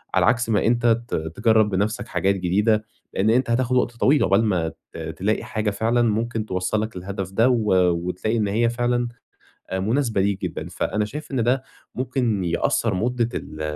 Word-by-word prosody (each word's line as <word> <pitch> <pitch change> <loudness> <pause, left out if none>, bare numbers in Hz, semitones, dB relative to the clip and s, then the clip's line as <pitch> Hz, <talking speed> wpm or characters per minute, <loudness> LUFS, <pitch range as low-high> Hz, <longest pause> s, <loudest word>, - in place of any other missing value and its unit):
على - - +4
عكس 120 -1 +2
ما 105 -2 +2
أنت 120 0 +1 0.2
ت - - -2
تجرِّب 105 +7 +2
بنفسك 105 +2 -1
حاجات 100 +1 +1
جديدة، 105 +4 +1 0.3
لأن 100 +3 +1
أنت 125 +2 +2
هتاخد 125 +1 +1
وقت 125 - +2
طويل 140 +4 +4
عُقبال 100 +4 +3
ما 90 -6 0 0.2
ت - - -8
تلاقي 85 +7 -2
حاجة 110 -1 -2
فعلًا 115 +4 +1
ممكن 115 0 0
توصِّلك 105 +2 -2
للهدف 95 0 -5
ده، 115 +6 +3
و 115 -5 +2 0.2
وتلاقي 90 +6 -2
إن 105 -2 +1
هي 115 +4 +2
فعلًا 120 0 0 0.6
آآ، 95 - -2
مناسبة 115 +1 +1
ليك 100 0 0
جدًا. - - -4
فأنا 105 0 -1
شايف 145 +9 -8
إن 130 -4 0
ده 130 +3 +1 0.3
ممكن 125 -6 -1
يقصِّر 85 -1 0
مدة 115 +4 0
ال 75 - -6
110 Hz, 180 wpm, -23 LUFS, 95-120 Hz, 0.6 s, على